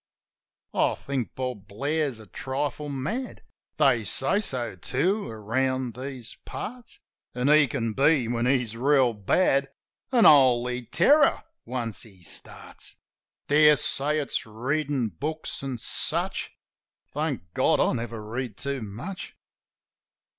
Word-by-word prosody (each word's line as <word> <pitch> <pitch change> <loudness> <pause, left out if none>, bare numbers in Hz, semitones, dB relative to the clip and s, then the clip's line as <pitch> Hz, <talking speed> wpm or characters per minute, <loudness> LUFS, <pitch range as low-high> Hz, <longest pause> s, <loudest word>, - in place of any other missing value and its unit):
(I - - +2
think 135 -4 -4
Bob 125 -7 -4
Blair's 140 +4 -1
a 110 - -11
trifle 135 +7 -4
mad; 175 - -4 0.3
They - - +4
say 200 - +4
so, 125 - -2
too, 175 - 0
around 125 +3 -1
these 130 -1 -7
parts; 245 0 -7 0.4
An' 125 +3 +1
he 150 -1 +6
can 115 -1 -2
be, 140 -1 +3
when 120 +1 0
he's 125 -4 +1
reel 130 -1 +3
bad, 135 - +2 0.4
A 240 -4 +4
holy 125 -4 +5
terror 285 - +4 0.2
once 115 -6 -3
he 95 -6 -12
starts. - - -6 0.5
Dare 150 +1 +6
say 145 +2 0
it's 145 -2 -1
readin' 130 +2 -1
books 155 - -4
an' 135 -2 -4
such. - - -1 0.6
Thank 140 - -3
God - - +3
I - - +3
never 115 -2 -4
read 120 -1 -4
too 140 -2 -1
much!) 120 - -7
130 Hz, 125 wpm, -26 LUFS, 115-150 Hz, 0.6 s, he